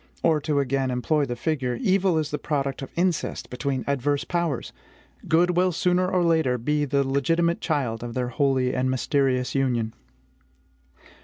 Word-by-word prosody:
Or, 160 -2 +3
to 150 -1 0
again 135 -1 0
employ 135 +4 +1
the 120 - -4
figure, 130 -2 -1
evil 190 -2 +2
is 155 -1 -1
the 150 - -2
product 140 -3 -2
of 135 - -6
incest 175 -2 -1
between 130 0 -2
adverse 140 +1 0
powers; 170 -7 -2 0.5
good 175 +2 +3
will 180 +1 +3
sooner 180 +2 +1
or 185 -1 +1
later 160 -7 +2
be 150 +5 0
the 140 -1 +1
legitimate 165 +5 +1
child 125 -8 -1
of 120 -1 -6
their 125 -1 -1
holy 130 -1 +1
and 130 0 0
mysterious 130 -1 0
union. 120 -5 0
140 Hz, 160 wpm, -25 LUFS, 130-165 Hz, 0.5 s, Or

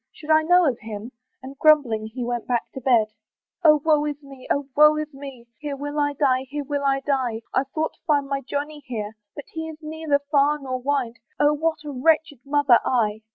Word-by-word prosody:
should 310 0 -6
I 310 0 +6
know 355 +2 +4
of 245 -4 -1
him?" 220 +2 -7 0.3
And, 270 +1 -10
grumbling, 260 -9 +4
he 245 +3 -6
went 240 -1 -3
back 240 -2 -1
to 265 - -7
bed. 230 -4 +2 0.5
"O 305 -2 +6
woe 305 -2 +4
is 295 -1 -3
me! 275 -2 -13
O 280 -1 0
woe 300 +1 +6
is 305 -1 -4
me! 270 -3 -10
"Here 295 -2 -4
will 290 +2 -4
I 290 0 +1
die; 265 -2 +1
here 290 +1 -4
will 285 0 -3
I 275 -1 +1
die; 255 -6 -1
"I 265 - +2
thought 310 +4 -3
to - - -31
find 290 -3 +2
my 275 0 -2
Johnny 290 +3 -4
here, 215 -4 -4 0.2
"But 290 - -8
he 320 0 -4
is 315 - -9
neither 310 -1 0
far 290 0 +3
nor 260 -3 -5
near, 270 -4 0 0.3
"Oh! 295 0 +4
what 320 +1 -1
a 295 - -5
wretched 300 +1 +1
mother 280 -3 +4
I!" 220 -4 0
280 Hz, 215 wpm, -23 LUFS, 255-300 Hz, 0.5 s, I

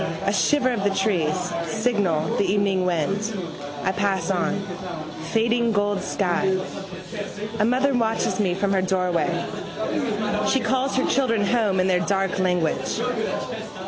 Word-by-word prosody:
A - - +2
shiver 270 -3 +3
of 230 -5 -1
the 200 - +3
trees, 190 -5 +1 0.3
signal, 190 -6 0
the - - +3
evening 195 -1 +2
wind. 195 +6 -1 0.5
I 190 - +2
pass 195 0 0
on. 185 +1 0 0.7
Fading 230 +1 +2
gold 205 -1 +1
sky. 190 0 +1 1.0
A 210 - +4
mother 260 +4 +2
watches 225 -2 +1
me 185 -4 +2
from 200 +1 0
her 190 - +3
doorway. 180 -2 0 1.0
She 265 - +3
calls 265 +2 0
her 260 - +2
children 230 -6 +2
home 210 -4 +2
in 185 - +3
their 185 -1 +3
dark 195 0 0
language. 180 +1 0
200 Hz, 135 wpm, -24 LUFS, 185-225 Hz, 1.0 s, A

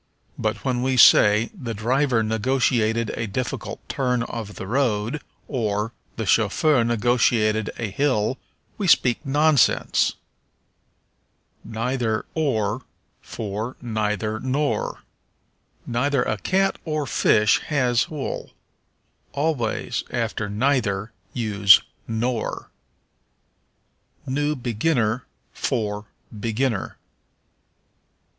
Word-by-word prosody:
But 110 +1 -3
when 125 -2 0
we 130 0 0
say, 105 -1 +6
"The 125 - -6
driver 120 +2 +1
negotiated 115 0 +1
a 115 - -3
difficult 125 +5 -4
turn 125 -3 0
of 110 -4 -6
the - - -6
road," 120 +3 0 0.3
or, 110 -3 -1 0.2
"The 110 - -3
chauffeur 115 +7 +3
negotiated 115 -2 +2
a 110 -4 -3
hill," 130 -1 0 0.4
we 200 - 0
speak 125 -5 +4
nonsense. 145 -1 +3 1.5
Neither 115 0 -2
or 115 -7 0 0.4
for 110 +3 -5
Neither 110 -2 -2
nor. 140 +4 -1 0.8
"Neither 125 +2 +1
a 110 - -2
cat 195 - +1
or 155 -2 -2
fish 105 -5 +3
has 125 -5 +1
wool." 150 -4 -5 0.8
Always 140 -6 -1
after 105 -2 -2
neither 110 -3 0 0.2
use 100 -4 +5 0.3
nor. 115 +1 -2 1.5
New 145 +3 0
Beginner 120 -1 0 0.3
for 105 -5 -2 0.3
Beginner. 115 0 -1
120 Hz, 90 wpm, -23 LUFS, 110-135 Hz, 1.5 s, say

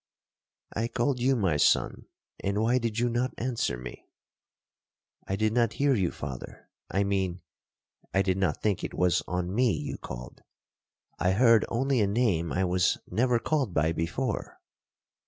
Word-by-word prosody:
'I 115 +2 0
called 120 +3 0
you, 130 +2 +3
my 95 -10 +1
son, - - +2 0.4
and 100 +1 0
why 120 +3 +3
did 115 -2 -2
you 120 +1 +2
not 120 +2 -1
answer 120 - -1
me?'—'I 60 +8 -12
did 110 +2 +1
not 115 -2 +2
hear 140 0 +2
you, 95 -8 +1
father—I 70 +8 -5
mean, 95 -3 -1 0.7
I 95 - +2
did 95 0 0
not 90 -7 0
think 105 -4 0
it - - -4
was 90 -1 +2
on 90 0 -2
me 120 +1 +3
you - - -4
called. - - -8 0.8
I 90 +1 +2
heard 115 0 +5
only 130 +1 +1
a 100 - +3
name 100 -7 +1
I 95 - 0
was 90 -1 +2
never 120 +5 +2
called 130 - -1
by 80 +2 +2
before. 85 +9 -3
105 Hz, 155 wpm, -28 LUFS, 90-120 Hz, 0.8 s, heard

